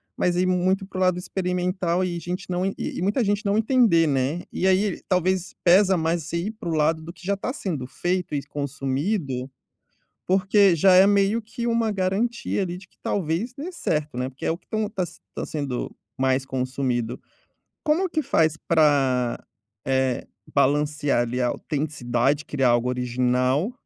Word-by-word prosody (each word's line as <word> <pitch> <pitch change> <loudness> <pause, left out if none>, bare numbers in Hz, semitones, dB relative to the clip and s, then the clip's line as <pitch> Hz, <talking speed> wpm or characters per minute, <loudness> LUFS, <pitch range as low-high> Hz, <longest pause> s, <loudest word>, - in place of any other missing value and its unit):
mas 175 -1 +1
aí 180 - +2
muito 185 +2 +1
pra 190 - -9
o - - -1
lado 185 -1 +3
experimental 180 -1 -1
e 175 -2 -2
gente 180 +4 -5
não 180 +1 0
e 195 - -1
e - - -4
muita 205 +7 +1
gente 205 +1 0
não 200 +1 +2
entender, 220 -8 +4
né. 140 +4 0
E 190 - 0
aí, 190 0 +2
talvez 185 0 +1
pesa 190 +1 +5
mais 165 0 0
você 170 +2 -3
ir 180 +6 -2
pra 215 -6 -7
um 165 - 0
lado 160 +1 +2
do 165 - -7
que 180 - -15
já 200 +1 +1
tá 225 - -3
sendo 170 - -3
feito 180 +4 -2
e 140 - -2
consumido, 140 - -2 0.8
porque 195 0 +4
já 185 +4 +5
é 185 +2 +7
meio 200 +2 +3
que 225 +2 -6
uma 230 -1 +1
garantia 205 +4 -1
ali 175 -1 -4
de 185 - -13
que - - -34
talvez 190 +6 -1
dê 295 +7 -6
certo, 150 - -2
né. 125 +1 -1
Porque 135 +1 -9
é - - +2
o 165 - -3
que - - -37
tão 215 -1 -1
tá 190 - -2
s 170 -1 -8
tá - - -4
sendo 140 -5 -4 0.2
mais 130 0 +1
consumido. 130 -2 -2 0.6
Como 330 +5 +2
que 315 - 0
faz 160 - +2
pra, 135 -6 +3 0.5
eh, 130 -1 0 0.3
balancear 145 -1 +2
ali 120 +1 -2
a 125 - +2
autenticidade, 140 -1 -1
criar 135 -3 +1
algo 120 +1 +2
original, 125 - +1
170 Hz, 180 wpm, -24 LUFS, 140-195 Hz, 0.8 s, é